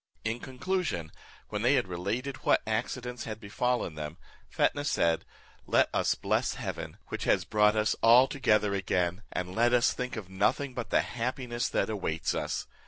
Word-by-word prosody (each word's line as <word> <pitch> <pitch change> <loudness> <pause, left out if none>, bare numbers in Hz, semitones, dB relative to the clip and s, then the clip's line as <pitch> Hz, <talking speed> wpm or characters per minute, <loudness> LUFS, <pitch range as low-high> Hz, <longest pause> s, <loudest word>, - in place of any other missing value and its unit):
In 110 +2 -1
conclusion, 130 - -2 0.4
when 105 -1 -3
they 125 +5 +4
had 125 -7 +1
related 105 +10 -3
what - - +2
accidents 120 +2 -3
had 110 -1 -5
befallen 120 -1 -1
them, 75 +1 -6 0.3
Fetnah 145 - +1
said, 85 - +1 0.4
"Let - - +4
us - - +2
bless - - 0
Heaven, - - -5
which - - -4
has - - +2
brought 105 0 +3
us 110 0 +2
all 120 +3 +7
together 105 -7 +2
again, 90 -1 0
and 90 0 -3
let 120 +4 +3
us 125 0 +4
think 125 0 -4
of 110 -5 -6
nothing 105 +8 0
but 125 -2 -5
the - - +4
happiness 125 0 -2
that 100 - +1
awaits 85 -6 -1
us. - - -2
110 Hz, 170 wpm, -29 LUFS, 95-125 Hz, 0.4 s, all